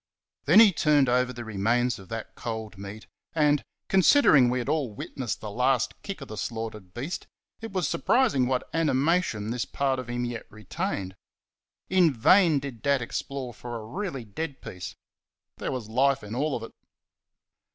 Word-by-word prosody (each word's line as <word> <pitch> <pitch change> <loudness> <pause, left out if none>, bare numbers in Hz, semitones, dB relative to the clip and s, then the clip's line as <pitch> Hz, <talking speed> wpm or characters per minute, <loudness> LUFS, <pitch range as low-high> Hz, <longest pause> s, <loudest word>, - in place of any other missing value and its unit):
Then 165 +9 +7
he 220 -3 +9
turned 150 -4 +3
over 125 +1 +2
the 120 -1 -7
remains 115 +3 +1
of 95 - -14
that 115 -1 -6
cold 110 -2 -5
meat, 100 +2 -9 0.3
and, 150 -2 +3 0.2
considering 185 - +6
we 125 - 0
had 120 - -3
all 145 -7 0
witnessed 120 +3 -5
the 105 - -6
last 125 +1 +1
kick 195 -6 -6
of 135 - -7
the 110 - -8
slaughtered 110 -5 -5
beast, 135 - -5 0.3
it 225 - -6
was 185 -2 0
surprising 225 - +2
what 130 0 -1
animation 150 - +1
this 120 0 -1
part 135 -2 -1
of 125 -1 -7
him 120 0 -2
yet 120 -1 -5
retained. 110 - -4 0.7
In 180 -4 +4
vain 165 - +5
did 135 -5 -5
Dad 140 -2 +2
explore 130 +1 -4
for 120 +2 -7
a 110 -2 -6
really 140 - -4
dead 140 +7 -5
piece 90 -1 -8 0.6
there - - -3
was 125 -5 -4
life 135 +3 +2
in 105 +1 -7
all 140 +4 0
of 115 - -5
it. 115 - -9
125 Hz, 170 wpm, -27 LUFS, 115-150 Hz, 0.7 s, he